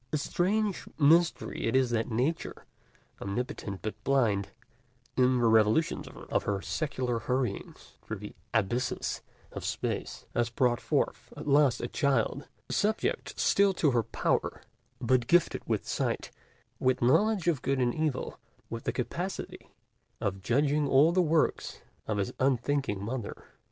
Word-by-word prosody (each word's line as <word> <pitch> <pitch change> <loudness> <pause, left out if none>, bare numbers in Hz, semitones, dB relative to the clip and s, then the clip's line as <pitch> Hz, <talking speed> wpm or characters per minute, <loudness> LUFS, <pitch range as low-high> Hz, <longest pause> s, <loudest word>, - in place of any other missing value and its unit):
A 155 - +1
strange 200 +6 0
mystery 160 +3 +3
it 115 - 0
is 130 -2 +3
that 115 0 0
Nature, 130 +9 -2 0.6
omnipotent 100 -2 -4
but 105 -1 -5
blind, 115 -8 +2 0.7
in 130 0 +4
the 120 - +2
revolutions 110 +7 +3
of - - -3
her 100 -1 0
secular 120 - -2
hurryings 125 +2 -3
through - - -5
the - - -9 0.2
abysses 120 +6 -1 0.3
of - - -7
space, - - -3
has 120 -1 +1
brought 120 0 +1
forth - - -1
at - - -7
last 140 -3 +4
a - - -2
child, 140 0 0 0.2
subject 220 - -1
still 200 -1 +4
to 150 -5 +3
her 120 -2 +3
power, - - -1 0.4
but 120 -1 +2
gifted 175 0 +3
with - - -1
sight, - - -2 0.5
with 130 -1 +1
knowledge 195 - +3
of 155 -7 +2
good 135 0 0
and 125 -2 +1
evil, 155 -4 -2 0.3
with 115 0 -5
the - - +1
capacity 170 +10 -4 0.5
of 95 -1 -2
judging 145 +7 +2
all 140 +5 +5
the 185 +1 +3
works 160 -2 +1 0.3
of 110 - -1
his 100 - -1
unthinking 130 -5 +1
Mother. 120 -2 -5
130 Hz, 140 wpm, -29 LUFS, 115-155 Hz, 0.7 s, all